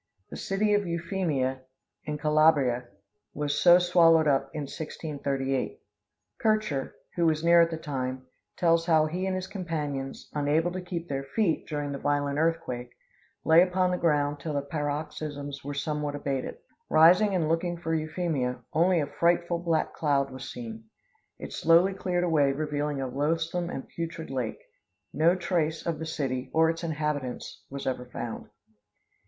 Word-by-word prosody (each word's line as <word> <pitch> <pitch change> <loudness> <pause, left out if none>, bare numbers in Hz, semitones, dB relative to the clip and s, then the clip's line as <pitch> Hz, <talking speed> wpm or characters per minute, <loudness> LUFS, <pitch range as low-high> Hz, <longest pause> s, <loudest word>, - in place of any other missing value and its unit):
The - - -6
city 210 +2 0
of 205 -2 +1
Euphemia, 165 -7 -1 0.4
in 150 -1 -3
Calabria, 150 -5 +3 0.5
was 145 0 -1
so 175 0 +8
swallowed 170 -3 +5
up 135 -2 +2
in 155 - -4
1638. 140 -2 -3 0.6
Kircher, 215 - 0 0.2
who 170 -1 +2
was 155 0 +1
near 170 0 +7
at 165 - +4
the 165 - -4
time, 130 -4 -4 0.3
tells 165 -1 +3
how 160 -2 +5
he 180 +5 -2
and 190 - -1
his 185 0 -3
companions, 150 -8 -4
unable 150 +4 +1
to 185 +1 -4
keep 175 -1 -5
their 135 -2 -3
feet, 165 +5 0
during 145 -2 -3
the 140 - -4
violent 145 0 0
earthquake, 160 -7 -1 0.6
lay 160 +1 +7
upon 185 0 +2
the 180 - 0
ground 145 -3 +1
till 155 0 -4
the 140 - 0
paroxysms 145 -1 -4
were 145 +1 -5
somewhat 150 0 -2
abated. 140 - -3 0.3
Rising 180 +6 +6
and 165 -4 +1
looking 170 +2 0
for 165 -1 -3
Euphemia, 155 -6 -1
only 170 +2 +3
a - - 0
frightful 170 +3 +1
black 165 -2 0
cloud 140 -3 +1
was 130 0 -7
seen. 115 -2 -8 0.5
It - - -8
slowly 170 +4 +4
cleared 180 -2 -1
away 150 -5 +3
revealing 150 -1 -2
a 135 - -2
loathsome 165 +6 -1
and 135 - -6
putrid 165 -2 -6
lake. 125 -4 -3 0.5
No 170 +3 +4
trace 170 -3 -1
of 165 -3 -2
the 160 - -4
city 130 -4 -3
or 160 0 +5
its 165 +1 -7
inhabitants 150 -5 -3
was 140 0 -6
ever 125 -1 -2
found. 115 - -5
155 Hz, 160 wpm, -28 LUFS, 140-170 Hz, 0.6 s, so